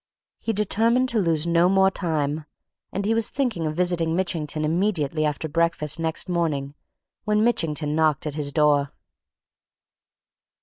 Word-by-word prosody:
He 225 - -2
determined 225 +4 +1
to 235 - +1
lose 165 -4 +1
no 170 +1 +3
more 190 0 +4
time 155 -4 -2 0.5
and 195 +1 -3
he 220 - +2
was 225 -1 +1
thinking 235 - -1
of 155 - -3
visiting 170 -2 +1
Mitchington 160 -4 -1
immediately 160 -3 0
after 150 +1 -2
breakfast 165 -1 0
next 160 0 -1
morning 155 -6 -1 0.5
when 210 0 +1
Mitchington 155 -10 0
knocked 155 -2 +1
at 150 - -3
his 145 -1 -3
door. 145 -1 +2
165 Hz, 140 wpm, -24 LUFS, 150-190 Hz, 0.5 s, more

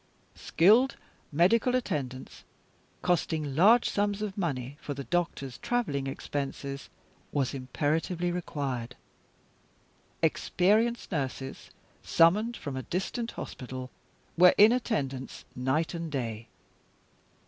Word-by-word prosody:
Skilled 225 - +4 0.4
medical 210 - +3
attendance, 135 - -3 0.6
costing 155 -5 0
large 220 +9 +6
sums 205 0 0
of 200 -2 -4
money 140 -8 -3
for 145 - -5
the 140 - -5
doctors' 140 -7 -2
traveling 145 - -1
expenses, 140 0 -4 0.4
was 140 -3 0
imperatively 155 +7 -1
required. 135 -8 -3 1.3
Experienced 220 +7 +2
nurses, 135 -4 -4 0.3
summoned 210 +8 +3
from 140 -3 -5
a 130 - -3
distant 210 - -3
hospital, 130 0 -7 0.4
were 180 +1 +7
in 210 +2 +8
attendance 140 - -2
night 130 +7 0
and 165 -2 -4
day. 115 -5 -3
155 Hz, 100 wpm, -29 LUFS, 135-200 Hz, 1.3 s, in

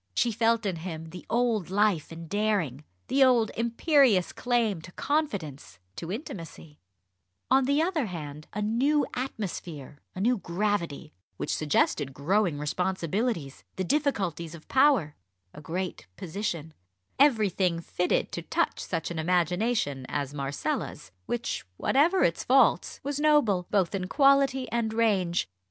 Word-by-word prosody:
She 240 - +2
felt 225 +1 +1
in 190 -4 -1
him 160 -1 -7
the 180 - -10
old 230 -6 +1
life 195 -5 +1
and 165 0 -8
daring, 200 - 0 0.2
the 270 +1 +4
old 240 -4 +4
imperious 235 - +3
claim 230 -8 0
to 175 - -12
confidence, 200 - -2 0.2
to 170 - -5
intimacy 165 - -8 0.7
on 265 0 +5
the 285 +4 +2
other 330 -8 0
hand 150 -4 -7
a 210 - -3
new 270 +8 +2
atmosphere, 170 - -5 0.2
a - - -6
new 235 +3 +2
gravity, 175 -5 -2 0.2
which - - -2
suggested 145 -2 +1
growing 175 +3 +1
responsibilities, 180 - -2
the 190 - -2
difficulties 185 - -1
of 160 - -14
power, 260 - +3 0.4
a 150 - -10
great 175 - -4
position 170 -3 -4 0.5
everything 205 -10 +3
fitted 180 +1 -1
to - - -4
touch - - -1
such 165 -1 -3
an 165 - -4
imagination 175 - 0
as 140 -1 -2
Marcella's, 140 -8 -3 0.2
which, 240 0 -2
whatever 330 +8 +3
its 165 - +1
faults, 250 -9 +3
was 285 +1 -2
noble, 245 - +3
both 195 -3 +1
in 185 -2 -2
quality 275 +1 +3
and 230 -2 -1
range. 190 - +1
195 Hz, 135 wpm, -28 LUFS, 165-240 Hz, 0.7 s, on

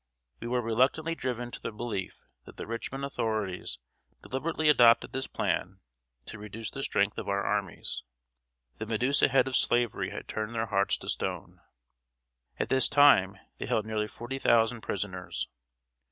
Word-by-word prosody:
We 115 - -5
were 125 0 0
reluctantly 130 +8 +2
driven 125 -5 -3
to - - -8
the - - -4
belief 105 -3 -4 0.3
that - - -13
the - - -5
Richmond 130 +4 -4
authorities 110 - -2 0.5
deliberately 155 +4 -1
adopted 120 -6 +6
this 135 0 -3
plan 95 +2 -1 0.5
to 110 - -9
reduce 105 +2 -7
the 135 - -5
strength 100 -5 +1
of - - -5
our 100 0 +1
armies. 100 -4 -2 0.8
The 110 - -4
Medusa 125 +5 +3
head 135 -1 +3
of 130 - -1
Slavery 120 -2 +1
had - - -7
turned 110 +2 -4
their 115 0 0
hearts 100 -2 +1
to - - -11
stone. - - -3 1.0
At - - -2
this 130 -1 +3
time, 100 -10 +6 0.2
they - - -4
held 110 - +1
nearly 110 -1 -1
forty 120 +5 -6
thousand 115 -1 +3
prisoners. 95 -3 -4
115 Hz, 155 wpm, -29 LUFS, 105-130 Hz, 1.0 s, adopted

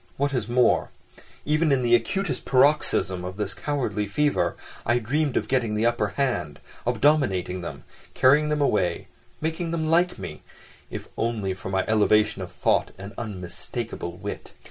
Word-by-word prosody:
What 140 +1 0
is 120 -5 -1
more, 120 0 +3 0.6
even 155 +1 +2
in 130 -2 +2
the 120 0 +2
acutest 195 +11 +1
paroxysm 130 -9 +2
of 90 +1 -6
this 105 -2 -2
cowardly 105 -4 -2
fever, 145 +8 +1 0.3
I 120 +2 +2
dreamed 140 +5 0
of - - -1
getting 120 -5 +1
the 110 +2 +1
upper 120 -3 +2
hand, 85 - -1 0.3
of 120 -2 0
dominating 95 - +2
them, 85 - -7 0.3
carrying 150 +4 +5
them 150 -1 0
away, 95 -10 +1 0.3
making 160 +2 -2
them 160 -1 -1
like 175 +2 +3
me—if - - -10
only 110 -5 -1
for 95 0 -7
my 95 0 0
"elevation 105 -1 +3
of 90 - -6
thought - - +1
and 100 +2 -8
unmistakable 100 -1 -5
wit." - - -7
120 Hz, 155 wpm, -25 LUFS, 100-145 Hz, 0.6 s, carrying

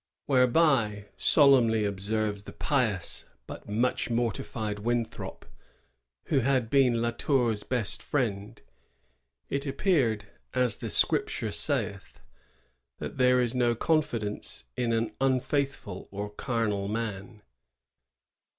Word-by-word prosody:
"^ - - -64 0.2
Whereby, 125 -6 +2
" - - -38 0.2
solemnly 120 -7 +5
observes 105 +1 -2
the - - -9
pious 115 - -1 0.2
but - - -10
much 120 +5 0
mortified 115 -2 -2
Winthrop, 120 +1 -3 0.8
who 145 - +1
had 130 -2 +1
been 125 -4 +3
La 120 - +1
Tour's 120 -5 0
best 120 -2 0
friend, 105 -8 -2
^ - - -36 0.8
it 140 +1 -3
appeared 135 - +1 0.3
(as 125 -3 +2
the - - -5
Scripture - - +2
saith) - - -2 0.8
that - - -7
there 125 0 +5
is 120 -1 0
no 120 -2 +2
confidence 115 -7 -1
in 120 -1 0
an 115 0 0
un&ithful 135 -5 -1
or 100 +1 -5
carnal 105 -3 -2
man." 105 0 -5
115 Hz, 115 wpm, -28 LUFS, 105-130 Hz, 0.8 s, solemnly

